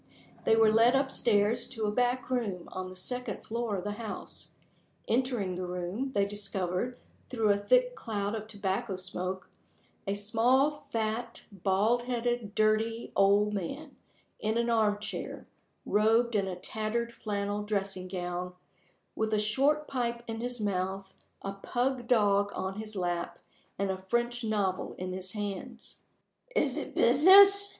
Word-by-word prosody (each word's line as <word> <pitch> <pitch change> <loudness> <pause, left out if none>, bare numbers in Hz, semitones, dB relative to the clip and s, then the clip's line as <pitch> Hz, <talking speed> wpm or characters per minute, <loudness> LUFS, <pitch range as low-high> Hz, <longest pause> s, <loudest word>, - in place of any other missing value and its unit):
They 225 - +5
were 225 -1 +5
led 230 +4 +5
up 270 0 +1
stairs 230 +2 +2
to 225 -3 -3
a 210 - +1
back 245 +3 0
room 205 -9 -2
on 185 0 -5
the 185 - -10
second 245 +3 -4
floor 230 -2 -2
of 185 - -4
the 205 - -2
house. 220 - -7 0.5
Entering 240 -6 0
the 180 0 -4
room, 180 +9 -3
they 200 -3 +3
discovered 200 +2 -2 0.3
through 225 -5 +2
a 200 - +3
thick - - +3
cloud 205 - -3
of 215 -1 -4
tobacco 200 -1 -2
smoke, 185 0 -4 0.6
a 195 - 0
small, 245 +8 +2
fat, 225 +1 -2
bald 200 +5 +1
headed, 240 -3 -2
dirty, 220 +2 +1
old 205 +1 +4
man, 275 - -5 0.4
in 220 +1 0
an 235 0 +1
arm 215 -3 +3
chair, 210 - -5 0.4
robed 225 +3 +3
in 200 -2 +1
a 185 - -3
tattered 220 +5 -3
flannel 205 -1 -2
dressing 195 -3 -2
gown, 180 0 -4 0.6
with 220 0 0
a - - +2
short 275 +8 +2
pipe 235 -3 -2
in 225 -1 -5
his 245 0 -3
mouth, 190 -1 -2 0.3
a 195 - -3
pug 245 +4 -2
dog 205 -4 +3
on 190 +2 -3
his 215 -1 -6
lap, 175 -2 -2 0.4
and 195 0 0
a 190 0 -5
French 240 0 0
novel 205 -4 -1
in 185 0 -5
his 185 0 -6
hands. 210 +3 -6 0.5
"Is - - +2
it - - -5
business?" 395 +10 +8
215 Hz, 150 wpm, -30 LUFS, 195-240 Hz, 0.6 s, business